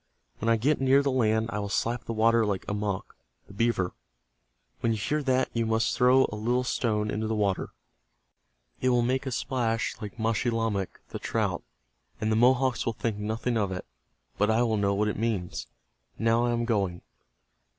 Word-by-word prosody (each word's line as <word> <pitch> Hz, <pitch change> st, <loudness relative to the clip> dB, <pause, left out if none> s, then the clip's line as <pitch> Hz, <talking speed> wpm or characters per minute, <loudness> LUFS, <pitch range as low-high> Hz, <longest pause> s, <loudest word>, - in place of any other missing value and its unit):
When 115 Hz, -, 0 dB
I 115 Hz, -, +5 dB
get 140 Hz, +6 st, +1 dB
near 135 Hz, +1 st, +4 dB
the 140 Hz, -, +1 dB
land 110 Hz, -2 st, +1 dB
I 105 Hz, -, -1 dB
will 100 Hz, -1 st, -3 dB
slap 115 Hz, +4 st, -1 dB
the -, -, -4 dB
water 115 Hz, +1 st, +4 dB
like 100 Hz, -3 st, -1 dB
Amoch, 105 Hz, -2 st, -3 dB, 0.3 s
the -, -, -14 dB
beaver. 100 Hz, -4 st, 0 dB, 0.9 s
When 115 Hz, -, +1 dB
you -, -, -2 dB
hear 150 Hz, +9 st, -1 dB
that 130 Hz, -2 st, +1 dB
you 115 Hz, -1 st, 0 dB
must 110 Hz, +2 st, +1 dB
throw 130 Hz, +1 st, +5 dB
a -, -, -5 dB
little 120 Hz, +4 st, 0 dB
stone 105 Hz, -4 st, 0 dB
into 110 Hz, +1 st, -2 dB
the 110 Hz, -, -1 dB
water. 100 Hz, -3 st, 0 dB, 1.1 s
It 130 Hz, -, +2 dB
will 120 Hz, -1 st, +3 dB
make 130 Hz, +3 st, 0 dB
a -, -, -2 dB
splash 115 Hz, -3 st, -1 dB
like 105 Hz, 0 st, -7 dB
Maschilamek, 115 Hz, -3 st, -1 dB
the -, -, -6 dB
trout, -, -, -1 dB, 0.6 s
and 110 Hz, 0 st, 0 dB
the -, -, +3 dB
Mohawks 125 Hz, +2 st, +3 dB
will 115 Hz, -, +1 dB
think 110 Hz, -1 st, -2 dB
nothing 110 Hz, +3 st, -1 dB
of 100 Hz, -3 st, 0 dB
it. 90 Hz, -, -5 dB, 0.5 s
But 105 Hz, -, +3 dB
I 110 Hz, +2 st, +3 dB
will 115 Hz, -2 st, +1 dB
know 100 Hz, -1 st, +1 dB
what 105 Hz, +1 st, +1 dB
it 105 Hz, -, -2 dB
means. 110 Hz, -6 st, -2 dB, 0.5 s
Now 115 Hz, +1 st, +2 dB
I 120 Hz, -, +1 dB
am 120 Hz, 0 st, 0 dB
going." 100 Hz, -7 st, -1 dB
115 Hz, 190 wpm, -28 LUFS, 105-120 Hz, 1.1 s, I